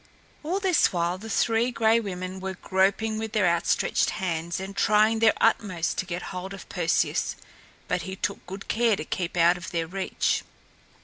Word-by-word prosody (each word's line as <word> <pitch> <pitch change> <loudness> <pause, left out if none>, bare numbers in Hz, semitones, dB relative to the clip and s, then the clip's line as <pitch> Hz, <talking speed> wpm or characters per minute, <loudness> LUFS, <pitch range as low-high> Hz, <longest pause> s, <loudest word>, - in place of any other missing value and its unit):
All 345 +6 -1
this 375 -5 +3
while 175 +1 -1
the 225 +3 -8
Three 230 +2 +2
Gray 230 -1 +3
Women 185 -3 -5
were 190 0 -4
groping 200 +4 +1
with 220 -1 -5
their 210 -5 +3
outstretched 170 +1 +1
hands 170 -1 -2
and 195 +1 -6
trying 215 +2 +3
their 225 -1 +5
utmost 205 -7 +1
to 185 - -2
get 175 0 -4
hold 190 +2 -5
of - - -12
Perseus. - - 0 0.5
But 180 -1 0
he 190 +3 -6
took 190 +1 -3
good 195 +2 -8
care 230 -1 +2
to 155 - -6
keep 180 0 -3
out 170 +1 +5
of 175 - -7
their 165 -1 -1
reach. 190 +3 -1
190 Hz, 180 wpm, -26 LUFS, 180-220 Hz, 0.5 s, their